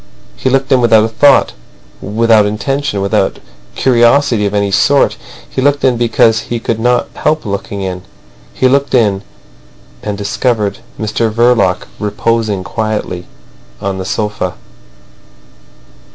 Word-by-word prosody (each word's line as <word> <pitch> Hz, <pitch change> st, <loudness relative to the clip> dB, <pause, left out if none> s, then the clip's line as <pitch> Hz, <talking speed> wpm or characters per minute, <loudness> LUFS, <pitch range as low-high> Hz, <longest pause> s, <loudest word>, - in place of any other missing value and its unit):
He 95 Hz, -, -1 dB
looked 135 Hz, +1 st, 0 dB
in 130 Hz, -2 st, +4 dB
without 110 Hz, -2 st, +5 dB
a -, -, +1 dB
thought, 135 Hz, +5 st, +3 dB, 0.5 s
without 110 Hz, +1 st, +3 dB
intention, 110 Hz, +1 st, -2 dB
without 100 Hz, -, 0 dB, 0.4 s
curiosity 120 Hz, -3 st, +3 dB
of 100 Hz, -, -4 dB
any 100 Hz, -1 st, 0 dB
sort. 140 Hz, +8 st, +3 dB, 0.3 s
He 130 Hz, -, -3 dB
looked 145 Hz, +1 st, +1 dB
in 130 Hz, -2 st, +3 dB
because 115 Hz, -1 st, +2 dB
he 120 Hz, -, -2 dB
could 115 Hz, 0 st, -2 dB
not 120 Hz, +1 st, +1 dB
help 155 Hz, -2 st, -1 dB
looking 100 Hz, 0 st, -4 dB
in. 90 Hz, -1 st, -4 dB, 0.5 s
He 130 Hz, -, +1 dB
looked 140 Hz, +1 st, +1 dB
in, 105 Hz, -5 st, +2 dB, 0.8 s
and 105 Hz, -1 st, -4 dB
discovered 105 Hz, 0 st, -1 dB, 0.2 s
Mr 110 Hz, +1 st, -1 dB
Verloc 115 Hz, -5 st, +2 dB, 0.2 s
reposing 105 Hz, -1 st, -1 dB
quietly 105 Hz, -3 st, -3 dB, 0.5 s
on 95 Hz, -1 st, -3 dB
the -, -, -3 dB
sofa. 105 Hz, -3 st, -3 dB
110 Hz, 130 wpm, -13 LUFS, 100-125 Hz, 0.8 s, without